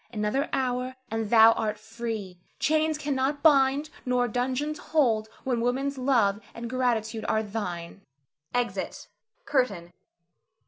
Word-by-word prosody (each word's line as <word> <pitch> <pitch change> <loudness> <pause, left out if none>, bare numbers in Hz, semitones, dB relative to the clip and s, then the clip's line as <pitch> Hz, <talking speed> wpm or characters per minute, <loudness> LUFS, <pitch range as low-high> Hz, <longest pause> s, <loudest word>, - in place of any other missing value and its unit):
Another 220 +6 -1
hour, 255 -1 -1 0.2
and 225 -1 -2
thou 225 0 +8
art 215 -2 -1
free. 220 -4 -6 0.2
Chains 310 +1 +2
cannot 285 -1 -1
bind, 285 0 +4
nor 250 -1 +1
dungeons 260 +6 -1
hold 230 -8 +1
when 245 -3 0
woman's 265 +3 -1
love 230 -7 +2 0.2
and 235 0 -5
gratitude 230 -3 -1
are 220 0 +2
thine. 195 -4 -5 0.5
[Exit. 245 -1 -3 0.4
CURTAIN. 200 -11 0
245 Hz, 120 wpm, -27 LUFS, 220-270 Hz, 0.5 s, thou